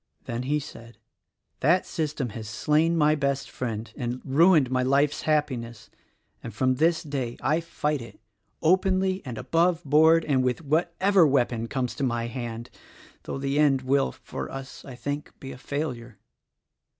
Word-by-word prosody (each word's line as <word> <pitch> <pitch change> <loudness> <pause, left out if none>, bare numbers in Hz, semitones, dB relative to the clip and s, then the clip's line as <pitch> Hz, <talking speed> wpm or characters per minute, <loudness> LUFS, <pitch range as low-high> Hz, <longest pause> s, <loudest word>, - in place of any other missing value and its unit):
Then 120 0 -4
he 145 +4 0
said, 115 -5 -11 0.6
"That 170 +6 +3
system 150 -6 -3
has 110 0 -7
slain 160 +7 +1
my 150 -1 +4
best 140 -2 -1
friend 115 -3 -5
and 125 -2 -3
ruined 150 -1 +4
my 130 0 +1
life's 140 +3 +2
happiness, 120 -7 -1 0.5
and 115 - -7
from 130 +2 +2
this 165 +3 +2
day 135 -6 -4
I 155 +4 +1
fight 150 -4 -2
it, 115 - -12 0.4
openly 185 +2 +2
and 125 -4 -6
above 170 +4 +1
board 160 +3 +5
and 135 -4 +2
with 130 +5 -1
whatever 170 +4 +3
weapon 120 -4 +1
comes 125 -1 -2
to - - -2
my 120 -2 0
hand; 120 -1 -6 0.5
though - - -4
the 140 +1 -1
end 135 -3 +3
will, 135 +1 +2
for - - -7
us, 135 0 -8
I 130 - -9
think, 145 +4 -5
be 135 0 -8
failure." 125 -5 -5
140 Hz, 155 wpm, -26 LUFS, 125-155 Hz, 0.6 s, board